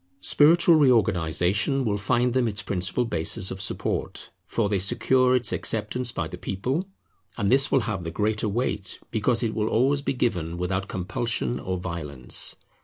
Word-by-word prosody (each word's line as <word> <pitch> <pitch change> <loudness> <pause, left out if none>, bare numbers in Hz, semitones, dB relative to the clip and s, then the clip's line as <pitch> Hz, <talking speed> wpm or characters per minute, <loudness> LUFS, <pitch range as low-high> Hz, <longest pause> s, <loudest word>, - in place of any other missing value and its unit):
Spiritual 165 - +5
reorganization 110 - +2
will 105 -2 0
find 120 +5 +1
them 125 -2 +2
its 105 -2 -3
principal 95 +5 +1
basis 95 -1 -1
of 95 - -6
support, 100 - -3 0.2
for 115 -3 0
they 100 -1 0
secure 130 +6 +2
its 125 -3 +1
acceptance 115 +3 -1
by 85 - -3
the 90 - -9
people; 130 - -3 0.5
and 100 +1 0
this 135 +2 +4
will 135 - +4
have 105 -6 -3
the 85 - -4
greater 105 +5 -1
weight, 100 -3 -2
because 115 +2 +1
it 110 -2 -1
will 110 -1 -1
always 135 +5 +2
be 140 - -1
given 90 -10 -1
without 95 +2 -2
compulsion 90 - -2
or 90 +6 -3
violence. 80 -8 -2
105 Hz, 165 wpm, -25 LUFS, 90-125 Hz, 0.5 s, Spiritual